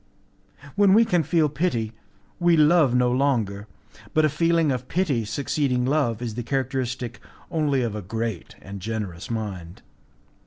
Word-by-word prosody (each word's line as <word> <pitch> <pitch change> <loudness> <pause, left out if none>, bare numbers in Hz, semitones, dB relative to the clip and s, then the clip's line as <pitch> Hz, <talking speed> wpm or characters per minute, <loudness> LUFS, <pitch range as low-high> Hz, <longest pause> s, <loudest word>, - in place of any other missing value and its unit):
When 200 -1 +5
we 230 +1 +6
can 180 -6 +2
feel 160 +1 +2
pity, 135 -8 -1 0.5
we 175 -1 +4
love 150 -4 +4
no 125 0 +3
longer, 115 -7 0 0.5
but 155 0 +4
a - - +3
feeling 165 0 +2
of 125 0 -3
pity 150 - 0
succeeding 135 +2 -1
love 130 -5 0
is 115 -3 -3
the 120 - -4
characteristic 130 -1 -3 0.3
only 145 -5 +1
of 115 -3 -2
a 105 - -4
great 110 -4 -4
and 100 0 -8
generous 100 -4 -5
mind. 100 -7 -5
130 Hz, 150 wpm, -24 LUFS, 110-155 Hz, 0.5 s, we